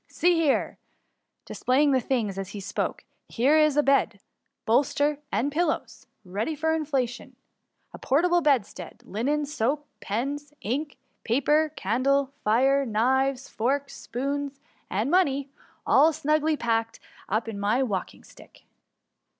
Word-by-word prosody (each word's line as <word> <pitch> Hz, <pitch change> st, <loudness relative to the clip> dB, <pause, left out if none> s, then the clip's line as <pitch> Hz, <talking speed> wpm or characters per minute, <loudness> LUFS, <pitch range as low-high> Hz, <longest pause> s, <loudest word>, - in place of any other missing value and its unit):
See 355 Hz, +1 st, +2 dB
here 325 Hz, -5 st, +1 dB, 0.6 s
!^ -, -, -58 dB
displaying 280 Hz, +3 st, +1 dB
the 260 Hz, -, +3 dB
things 220 Hz, -6 st, -1 dB
as 195 Hz, -1 st, -5 dB
he 205 Hz, -, -7 dB
spoke; 195 Hz, -, -3 dB, 0.3 s
^^ -, -, -21 dB
here 275 Hz, +7 st, +3 dB
is 305 Hz, -2 st, +3 dB
a 295 Hz, -, +5 dB
bed, 270 Hz, -7 st, +2 dB, 0.5 s
bolster, 285 Hz, +5 st, +2 dB
and 280 Hz, +4 st, 0 dB
pillows, 320 Hz, +1 st, -2 dB, 0.2 s
ready 205 Hz, -, -3 dB
for 320 Hz, +2 st, 0 dB
inflation; 275 Hz, -6 st, -2 dB, 0.6 s
a -, -, -9 dB
portable 345 Hz, +6 st, +2 dB
bedstead, 240 Hz, -, -1 dB
linen, 285 Hz, +8 st, -1 dB
soap, 285 Hz, +1 st, -1 dB
pens, 280 Hz, +7 st, -4 dB
ink, 280 Hz, +7 st, -3 dB, 0.3 s
paper, 295 Hz, +6 st, +2 dB
candles, 265 Hz, +6 st, +1 dB
fire, 265 Hz, +6 st, +3 dB
knives, 265 Hz, +3 st, +1 dB
forks, 275 Hz, +5 st, -2 dB
spoons^ 280 Hz, +3 st, -2 dB, 0.3 s
and 215 Hz, +9 st, -1 dB
money; 280 Hz, -7 st, +2 dB, 0.3 s
all 305 Hz, +4 st, +5 dB
snugly 310 Hz, 0 st, +1 dB
packed 225 Hz, -2 st, -1 dB, 0.3 s
up 220 Hz, +3 st, 0 dB
in 215 Hz, -3 st, -5 dB
my 215 Hz, +6 st, +1 dB
walking 200 Hz, -7 st, -4 dB
sdck -, -, -18 dB
275 Hz, 135 wpm, -26 LUFS, 230-295 Hz, 0.6 s, a